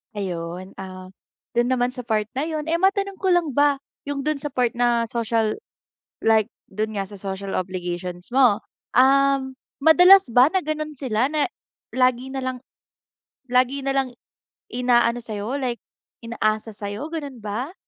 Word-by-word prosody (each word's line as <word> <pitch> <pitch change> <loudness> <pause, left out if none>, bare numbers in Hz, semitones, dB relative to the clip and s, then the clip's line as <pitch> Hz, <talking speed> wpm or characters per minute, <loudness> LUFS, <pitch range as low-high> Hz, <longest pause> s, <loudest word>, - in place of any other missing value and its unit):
Ayun, 180 -1 -5
ah, 185 -1 -8 0.5
dun 240 0 +3
naman 245 0 +1
sa 250 -1 -8
part 215 -2 0
na 290 - 0
yun, 310 -1 -3
eh, 335 - +2
matanong 390 +1 +1
ko 375 -2 +2
lang 345 -4 +2
ba 285 +1 +2 0.2
yung 285 -1 -3
dun 305 +1 -1
sa 285 -1 -6
part 245 -3 +2
na 235 -2 +2
social 225 -2 0 0.7
like 220 -1 +4 0.2
dun 215 +2 -3
nga 200 - -1
sa 195 +1 -9
social 195 0 -4
obligations 180 0 -5
mo, 245 -5 +4 0.3
um, 270 0 +4 0.2
madalas 360 -1 +7
ba 250 +3 +6
na 370 +3 0
gano'n 305 0 -3
sila 250 -3 0
na 305 +4 0 0.4
lagi 255 0 +1
nalang 260 -1 -4 0.9
lagi 255 +2 +2
nalang 270 -2 0 0.6
inaano 240 -1 +2
sa'yo, 215 +4 -3
like 250 -4 -2 0.4
inaasa 220 -2 -2
sa'yo, 205 +9 -5
ganun 285 -7 -6
ba? 220 - -4
250 Hz, 150 wpm, -23 LUFS, 215-280 Hz, 0.9 s, madalas